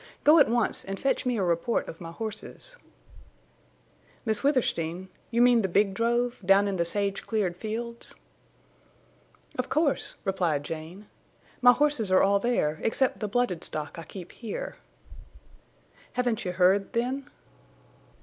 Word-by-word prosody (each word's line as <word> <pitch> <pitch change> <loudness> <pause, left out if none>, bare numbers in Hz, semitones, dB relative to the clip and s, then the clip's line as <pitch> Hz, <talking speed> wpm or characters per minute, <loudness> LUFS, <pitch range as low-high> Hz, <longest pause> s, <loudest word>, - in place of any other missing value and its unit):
"Go 310 +2 +7
at 285 - +5
once 235 -1 0
and 195 0 -5
fetch 270 -1 0
me 245 -2 +1
a 195 - 0
report 175 +6 0
of 165 - -9
my 165 -1 -7
horses." 220 - -6 1.5
"Miss 220 -2 0
Withersteen!... 190 - 0 0.2
You 235 +1 +3
mean 245 -2 +5
the 195 - 0
big 195 +2 +2
drove—down 230 -3 +2
in 195 -1 -1
the 170 - +1
sage 200 +3 -2
cleared 205 -6 0
fields?" 235 +4 -6 1.4
"Of - - -1
course," 305 -3 +1
replied 175 -7 0
Jane. 165 +6 -7 0.6
"My 245 0 +9
horses 290 -7 +1
are 185 - +5
all 200 +1 +4
there, 180 -10 0
except 265 +4 +1
the 210 - -2
blooded 205 -5 0
stock 155 +1 -4
I - - -7
keep 180 +2 -10
here." 375 - -6 1.4
"Haven't 245 -4 0
you 180 - -2
heard—then?" 230 +9 +1
210 Hz, 140 wpm, -27 LUFS, 180-245 Hz, 1.5 s, My